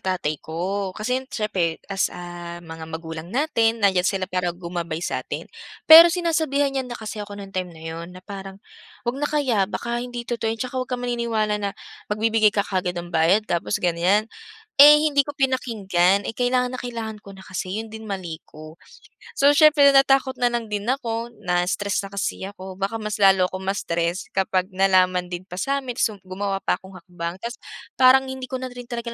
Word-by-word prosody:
tatay 175 -5 -2
ko 190 +4 -3
kasi 250 +5 -1
yun - - -18
siyempre 185 -7 -1
as, 195 -1 0
ah, 175 -1 -8
mga 160 -1 -9
magulang 165 +1 -8
natin 230 -4 +1
nandiyan 190 -3 +3
sila 190 -2 -1
para 180 -1 -1
gumabay 170 -2 -5
sa - - -2
atin. - - -6 0.4
Pero 330 +2 +11
sinasabihan 315 -5 0
niya 265 -1 -1
na 240 -1 -7
kasi 215 -1 -6
ako 205 0 -9
nung 195 0 -10
time 185 -1 -2
na 160 - -14
yun 165 +1 -6
na 180 - -11
parang, 195 -1 -8 0.5
"'Wag 240 +2 -1
na 290 - -2
kaya 260 -10 +2
baka 235 +2 -3
hindi 245 -1 -6
totoo 230 -2 -1
tsaka 255 0 -4
'wag 255 0 -2
kang 250 -1 -2
maniniwala 230 -3 0
na 200 -1 -1 0.4
magbibigay 215 0 +3
ka 205 - +1
kaagad 180 -2 -2
ng 175 - -10
bayad 180 +7 +3
tapos 175 +3 -1
ganiyan." 180 +5 +2 0.6
Eh 295 +1 +10
hindi 285 -2 +4
ko 290 +1 -7
pinakinggan, 200 -8 +1
eh - - -3
kailangan 250 +1 0
na 255 - -4
kailangan 225 -3 -6
ko 195 -1 -12
na 190 - -13
kasi, 185 +1 -4
yun 220 0 -6
din 220 -1 -8
mali 175 -5 -5
ko. 155 +1 -13 0.6
So, 280 +1 +5
siyempre 290 -2 +6
natakot 270 -1 +4
nalang 240 -3 0
din 205 +2 -2
ako, 235 -3 -2
na-stress 180 +3 0
na 195 - -8
kasi 200 0 -3
ako, 190 -1 -9
baka 200 +4 -1
mas 210 -1 -4
lalo 190 -2 +6
ako 185 +1 -5
ma-stress 175 -2 -2
kapag 190 0 0
nalaman 185 -1 +3
din 180 +1 -6
pa 185 - -12
sa'min, 275 0 -1
sum 215 -2 +1
gumawa 195 +1 -3
pa - - 0
akong 190 0 -12
hakbang. 170 -1 -6
Tapos 235 +6 -7 0.3
parang 260 +1 +6
hindi 260 -1 -6
ko 260 - -2
na 255 -1 -6
rin 245 -1 -10
talaga 235 -1 -4
205 Hz, 190 wpm, -23 LUFS, 185-245 Hz, 0.6 s, Pero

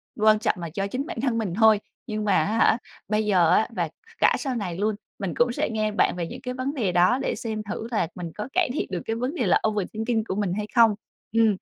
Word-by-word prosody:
quan 215 0 +4
trọng - - +1
là 170 -1 -5
do 195 0 -1
chính 260 +7 -3
bản 350 -1 -7
thân 250 -4 0
mình 200 -6 -2
thôi, 220 0 +5 0.3
nhưng 215 -1 -3
mà 200 - +3
á 220 +3 -1
hả, 225 - +4 0.3
bây 215 0 +1
giờ 180 -5 +4
á 220 - +4
và - - -1 0.3
cả - - +5
sau 265 -4 -2
này 180 -6 -3
luôn, 210 +1 0 0.2
mình 195 -5 -3
cũng 240 0 +3
sẽ - - -1
nghe 215 -1 0
bạn 205 - +2
về 170 -2 -3
những 250 +5 -8
cái 250 -1 -4
vấn 260 +3 -3
đề 215 -10 0
đó 180 +9 +4
để - - -1
xem 220 -3 -4
thử 225 - -4
là 195 -7 +1
mình 170 -3 -6
có 210 +3 -4
cải 360 -6 +2
thiện - - -2
được 180 - -2
cái 225 - -1
vấn 250 +6 -2
đề 245 - 0
là 180 - +3
overthinking 220 +2 -1
của 190 - -2
mình 200 -4 0
hay 210 0 -3
không. 225 -3 +6 0.4
Ừm, 225 0 +4
215 Hz, 265 wpm, -25 LUFS, 200-235 Hz, 0.4 s, không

